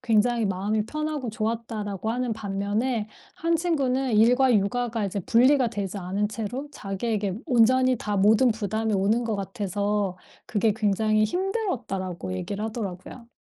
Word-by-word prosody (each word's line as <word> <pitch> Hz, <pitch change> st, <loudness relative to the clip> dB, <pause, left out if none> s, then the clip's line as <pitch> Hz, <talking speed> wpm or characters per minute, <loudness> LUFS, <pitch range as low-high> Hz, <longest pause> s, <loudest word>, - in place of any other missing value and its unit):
굉장히 230 Hz, -1 st, +2 dB
마음이 205 Hz, +3 st, -1 dB
편하고 305 Hz, -2 st, -3 dB
좋았다."라고 220 Hz, -2 st, -3 dB
하는 245 Hz, 0 st, -1 dB
반면에 210 Hz, +3 st, -2 dB, 0.3 s
한 335 Hz, -1 st, +1 dB
친구는 270 Hz, -6 st, 0 dB
"일과 245 Hz, +3 st, +5 dB
육아가 225 Hz, +2 st, 0 dB
이제 200 Hz, 0 st, -2 dB
분리가 250 Hz, +6 st, +4 dB
되지 205 Hz, -2 st, -4 dB
않은 195 Hz, +3 st, -1 dB
채로 230 Hz, +6 st, -5 dB
자기에게 200 Hz, -3 st, -2 dB
온전히 255 Hz, +1 st, +4 dB
다 210 Hz, -2 st, -2 dB
모든 215 Hz, +6 st, +5 dB
부담이 220 Hz, 0 st, -1 dB
오는 210 Hz, +5 st, +2 dB
것 225 Hz, -2 st, -1 dB
같아서 200 Hz, -1 st, -2 dB, 0.3 s
그게 215 Hz, 0 st, +1 dB
굉장히 215 Hz, 0 st, +2 dB
힘들었다."라고 225 Hz, -, -2 dB
얘기를 200 Hz, -, -4 dB
하더라고요. 220 Hz, +1 st, -6 dB
220 Hz, 345 characters per minute, -25 LUFS, 200-245 Hz, 0.3 s, 일과